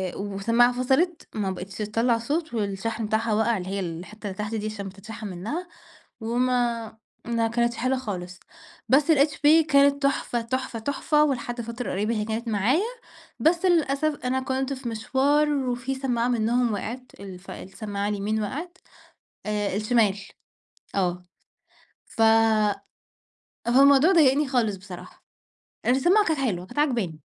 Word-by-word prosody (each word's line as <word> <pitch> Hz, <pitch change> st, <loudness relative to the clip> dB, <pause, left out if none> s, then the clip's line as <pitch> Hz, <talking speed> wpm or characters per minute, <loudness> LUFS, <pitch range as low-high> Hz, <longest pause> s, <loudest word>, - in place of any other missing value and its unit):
وسماعة 230 Hz, +5 st, +2 dB
فصلت 320 Hz, +7 st, +1 dB
ما 200 Hz, -3 st, -1 dB
بقيتش 185 Hz, +1 st, -7 dB
تطلّع 230 Hz, +3 st, +1 dB
صوت، 300 Hz, +6 st, -3 dB
والشاحن 220 Hz, +1 st, -2 dB
بتاعها 220 Hz, +1 st, 0 dB
وقع 220 Hz, +1 st, +2 dB
اللي 185 Hz, 0 st, -6 dB
هي 200 Hz, +1 st, -2 dB
الحتة 185 Hz, +4 st, -7 dB
اللي 190 Hz, -, -6 dB
تحت 210 Hz, +1 st, -3 dB
دي 215 Hz, -1 st, -3 dB
عشان 200 Hz, -2 st, -5 dB
بتتشحن 210 Hz, +3 st, -9 dB
منّها، 220 Hz, -, -5 dB, 0.5 s
وما 235 Hz, -1 st, 0 dB, 0.3 s
ما 230 Hz, -1 st, 0 dB
كانتش 235 Hz, +1 st, 0 dB
حلوة 255 Hz, +2 st, 0 dB
خالص، 185 Hz, -7 st, -6 dB, 0.5 s
بس 285 Hz, +5 st, +4 dB
الHP 300 Hz, 0 st, +2 dB, 0.3 s
كانت 280 Hz, 0 st, +4 dB
تحفة، 255 Hz, -3 st, 0 dB
تحفة، 255 Hz, 0 st, -3 dB
تحفة، 285 Hz, +5 st, +1 dB
ولحد 245 Hz, -3 st, -2 dB
فترة 235 Hz, +2 st, -5 dB
قريّبة 210 Hz, +4 st, -1 dB
هي 210 Hz, -1 st, -1 dB
كانت 225 Hz, +2 st, -3 dB
معايا 225 Hz, -, +2 dB, 0.6 s
بس 340 Hz, +3 st, +2 dB
للأسف 310 Hz, -4 st, +1 dB
أنا 255 Hz, +1 st, +1 dB
كنت 265 Hz, +1 st, -2 dB
في 260 Hz, -2 st, -5 dB
مشوار 275 Hz, +7 st, +1 dB
وفي 260 Hz, -2 st, -1 dB
سماعة 245 Hz, -3 st, 0 dB
منهم 240 Hz, 0 st, +1 dB
وقعت، 245 Hz, +5 st, -5 dB
الف 190 Hz, -2 st, -9 dB
السماعة 205 Hz, +1 st, -5 dB
اليمين 210 Hz, +1 st, -1 dB
وقعت 320 Hz, -, -5 dB, 0.7 s
آآ، 210 Hz, -2 st, -1 dB
الشمال، 215 Hz, -2 st, +2 dB, 0.8 s
آه، 180 Hz, -2 st, -1 dB, 0.8 s
ف 225 Hz, -, -3 dB, 1.5 s
هو 255 Hz, +3 st, +6 dB
الموضوع 280 Hz, +5 st, +6 dB
ضايقني 295 Hz, -4 st, +4 dB
خالص 235 Hz, -6 st, +1 dB
بصراحة، 185 Hz, -1 st, -12 dB, 0.6 s
لأن 245 Hz, -, +4 dB
السماعة 365 Hz, +10 st, +4 dB
كانت 320 Hz, -3 st, 0 dB
حلوة 195 Hz, -10 st, -1 dB
كانت 245 Hz, +9 st, -6 dB
عجباني. 230 Hz, -, 0 dB
235 Hz, 140 wpm, -25 LUFS, 210-270 Hz, 1.5 s, هو